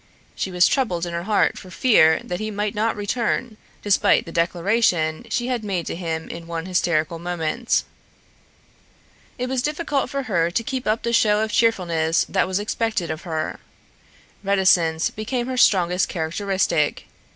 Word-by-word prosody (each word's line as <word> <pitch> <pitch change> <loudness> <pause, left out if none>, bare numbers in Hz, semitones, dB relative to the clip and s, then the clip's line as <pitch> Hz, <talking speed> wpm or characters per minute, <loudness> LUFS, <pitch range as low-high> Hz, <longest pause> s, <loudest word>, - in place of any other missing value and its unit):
She - - -3
was 180 -1 +4
troubled 185 -11 0
in 170 - -6
her 170 +1 -3
heart 215 0 +1
for 185 - -12
fear 170 -6 +4
that 180 - -4
he 215 0 -3
might 210 0 -2
not 220 +1 0
return, 225 +2 -2 0.3
despite 205 -1 +3
the 165 - -8
declaration 170 +1 +1
she 240 +2 -1
had 245 -3 -2
made 190 -5 -2
to - - -4
him 165 -2 -4
in 170 0 -8
one 165 0 -4
hysterical 170 -3 0
moment. 175 +6 -1 1.5
It 250 - -2
was 260 -1 -1
difficult 295 -2 -1
for 275 +1 -3
her 170 -9 +1
to 210 +7 -1
keep 260 +2 -4
up 215 +2 0
the 235 0 -1
show 210 -2 +3
of 220 - -3
cheerfulness 170 -9 +2
that - - +1
was 185 0 -1
expected 210 -4 -1
of 160 +4 -7
her. 155 -1 -3 0.8
Reticence 180 -5 +2
became 240 +3 -3
her 260 0 -3
strongest 180 -6 +3
characteristic. 170 -2 -1
190 Hz, 160 wpm, -22 LUFS, 170-230 Hz, 1.5 s, was